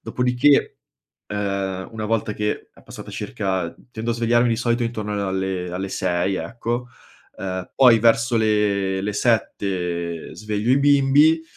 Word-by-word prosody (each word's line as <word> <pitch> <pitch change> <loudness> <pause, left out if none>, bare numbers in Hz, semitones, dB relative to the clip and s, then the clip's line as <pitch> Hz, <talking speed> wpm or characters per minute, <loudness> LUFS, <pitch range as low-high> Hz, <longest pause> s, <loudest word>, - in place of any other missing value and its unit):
Dopodiché, 125 +3 +2 0.5
uhm, 100 -2 -3
una 110 -1 -5
volta 110 -1 0
che 105 0 -3
è - - -19
passata - - -10
circa 95 -3 -3 0.2
tendo 115 +1 -3
a - - 0
svegliarmi 120 +1 +2
di 115 - +1
solito 120 0 0
intorno 110 -3 -3
a 100 -2 -2
alle 95 -1 -2
alle 95 +2 -4
6 90 +1 0
ecco, 120 +3 -4 0.5
uhm, 95 -1 -5
poi 125 -4 +7
verso 115 +2 +3
le 105 -3 +1
le 105 +1 -2
7 90 -7 -1
sveglio 105 +2 -2
i 135 - +5
bimbi, 145 +3 +4
105 Hz, 145 wpm, -22 LUFS, 95-120 Hz, 0.5 s, poi